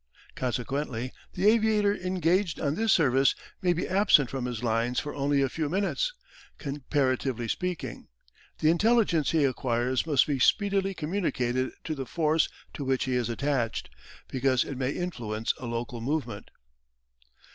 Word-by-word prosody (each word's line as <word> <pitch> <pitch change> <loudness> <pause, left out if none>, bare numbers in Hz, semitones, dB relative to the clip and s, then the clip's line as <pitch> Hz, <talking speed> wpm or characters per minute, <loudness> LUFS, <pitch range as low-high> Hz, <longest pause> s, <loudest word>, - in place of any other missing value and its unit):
Consequently 125 0 -3 0.2
the 185 +1 -1
aviator 215 -2 +4
engaged 180 -1 0
on 140 -1 0
this 220 +5 +1
service 135 -5 +4 0.3
may 180 - +3
be 175 0 -1
absent 185 - +4
from 130 -2 -3
his 120 -2 -4
lines 115 +2 +1
for 145 - -5
only 140 0 +1
a - - +2
few 150 +3 -3
minutes, 200 - 0 0.5
comparatively 135 -4 -1
speaking; 180 +6 -4 0.5
the 155 - +5
intelligence 200 - +3
he 160 -3 +2
acquires 125 +1 0
must 145 -5 +4
be 140 -3 -1
speedily 195 +5 +2
communicated 145 -8 -1
to 160 - -3
the 135 -4 -5
force 160 -1 +1 0.2
to 145 - -5
which 130 -1 +1
he 130 - -1
is 120 -2 0
attached, 120 - -1 0.4
because 130 -1 +1
it 140 - -6
may 130 0 -1
influence 115 -10 -2
a 125 - -6
local 120 +1 -4
movement. 125 -5 -3
140 Hz, 145 wpm, -28 LUFS, 125-175 Hz, 0.5 s, the